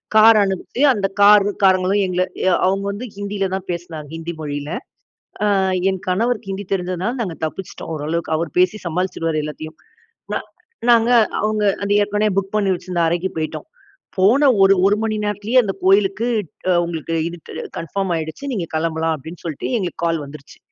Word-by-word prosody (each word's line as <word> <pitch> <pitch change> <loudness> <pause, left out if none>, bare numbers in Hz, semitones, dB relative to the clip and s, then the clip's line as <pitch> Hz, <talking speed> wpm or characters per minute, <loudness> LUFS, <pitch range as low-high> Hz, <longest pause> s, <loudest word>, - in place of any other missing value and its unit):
Car 220 0 +8
அனுப்பி 195 +6 -2
அந்த 200 -3 0
car 205 0 +7 0.2
காரங்களும் 190 +1 +3
எங்கள 180 0 0 0.2
எ 190 - +4 0.2
அவங்க 195 +1 +1
வந்து 215 +5 -6
ஹிந்தியில 200 -1 -2
தான் 190 0 -3
பேசினாங்க. 170 -3 -6
ஹிந்தி 165 +1 -5
மொழியில. 145 -1 -4 0.9
ஆ - - +2 0.3
என் 190 -1 -1
கணவருக்கு 210 +2 0
ஹிந்தி 195 +1 -4
தெரிஞ்சதுனால 185 +4 -1
நாங்க 190 -7 -2
தப்பிச்சிட்டோம், 165 +2 -6
ஓரளவுக்கு 160 +2 -3
அவர் 165 -1 -3
பேசி 185 +4 +3
சமாளிச்சிடுவாரு 165 -2 -1
எல்லாத்தையும். 155 +1 -7 0.6
ந - - 0 0.5
நாங்க 230 0 +5 0.3
அவங்க 215 0 0 0.2
அது 200 0 +1
ஏற்கனவே 210 +1 +1
புக் 195 +1 -1
பண்ணி 200 -2 +2
வெச்சிருந்த 175 -1 -3
அறைக்கு 175 +3 0
போய்ட்டோம். 160 - -4 0.5
போன 255 +10 +5
ஒரு 195 0 +7
1 205 - +3
மணி 220 -1 0
நேரத்திலேயே 210 +5 +2
அந்த 195 -3 -2
கோவிலுக்கு 195 +4 +3 0.4
அ 185 - +5
உங்களுக்கு 165 -1 -4
இது 175 - -8 0.3
அ - - -8
கன்ஃபர்ம் 185 +3 -3
ஆயிடுச்சு, 160 - -6
நீங்க 175 -7 -3
கிளம்பலாம் 160 0 0
அப்படினு 160 +5 -10
சொல்லிட்டு 155 -4 -4
எங்களுக்கு 180 -4 -4
கால் 165 -2 0
வந்துருச்சு. 140 0 -12
190 Hz, 160 wpm, -20 LUFS, 165-205 Hz, 0.9 s, Car